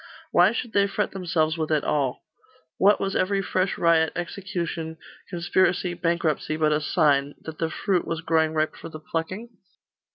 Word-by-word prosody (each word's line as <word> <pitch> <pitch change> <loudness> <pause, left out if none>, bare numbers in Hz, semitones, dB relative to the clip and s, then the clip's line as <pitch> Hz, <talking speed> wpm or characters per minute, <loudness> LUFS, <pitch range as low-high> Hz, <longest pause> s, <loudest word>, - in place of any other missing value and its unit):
Why 180 +3 +5
should 235 -1 -4
they 200 0 +4
fret 200 +1 -1
themselves 165 -4 0
with 155 - -1
it 150 -2 +2
all? 140 -4 -1 0.6
What 205 +2 +5
was 195 0 -2
every 195 +1 +1
fresh 185 0 0
riot, 165 -2 +3
execution, 175 -3 -4 0.3
conspiracy, 180 0 +1
bankruptcy, 165 -3 -1
but 155 -1 +2
a 150 - +1
sign 145 -3 +2
that 160 -1 -8
the 165 - 0
fruit 180 +2 -1
was 165 -1 -2
growing 160 -1 +1
ripe 155 0 0
for - - -9
the 155 - -9
plucking? 165 +9 -4
170 Hz, 165 wpm, -25 LUFS, 155-185 Hz, 0.6 s, Why